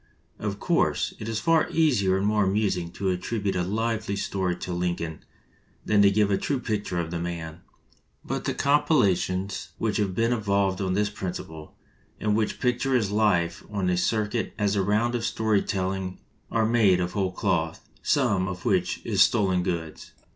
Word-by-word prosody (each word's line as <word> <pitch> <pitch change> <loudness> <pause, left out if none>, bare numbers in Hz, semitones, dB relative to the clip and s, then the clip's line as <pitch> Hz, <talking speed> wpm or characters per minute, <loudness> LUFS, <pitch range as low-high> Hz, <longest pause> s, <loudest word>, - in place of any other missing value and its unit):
Of - - -3
course, - - +1
it 110 - -5
is 110 -1 -1
far 165 +6 +2
easier 115 -13 +2
and 95 - -1
more 105 0 +3
amusing 95 -3 0
to 95 +1 -1
attribute 100 +2 -2
a 90 - +1
lively 110 +2 -1
story 95 -2 -1
to 90 0 -5
Lin 90 0 0
coln 80 -2 -6 0.7
than 105 -1 +4
to 100 - +7
give 100 0 +2
a 100 - +2
true 140 -2 -1
picture 105 -7 -2
of 85 -1 -3
the 85 - -2
man; 85 -1 -5 0.6
but - - -3
the - - -1
compilations 100 - +1
which 110 -2 -1
have 100 -3 -1
been 115 +3 +2
evolved 100 -3 0
on 95 -1 0
this 105 +2 +1
principle, 80 -5 -7 0.4
and 105 -1 +1
which 110 -1 -1
picture 125 +1 +1
his 110 -5 +1
life 90 -6 +1
on 100 -3 -2
the 90 0 +2
cir 105 +4 +1
cuit 115 +2 -3
as 105 -1 +1
a 100 - +2
round 105 +5 +1
of 120 -2 -1
story 110 -3 +1
telling, 95 -1 -2 0.3
are 115 -1 +1
made 110 -5 +4
out - - +1
of 90 +1 -4
whole 95 -2 0
cloth 85 -4 -1
— - - -31
some 95 -1 +2
of 90 -1 -6
which - - +1
is - - +2
stolen 95 -5 +3
goods. 85 -3 -4
100 Hz, 190 wpm, -26 LUFS, 90-110 Hz, 0.7 s, to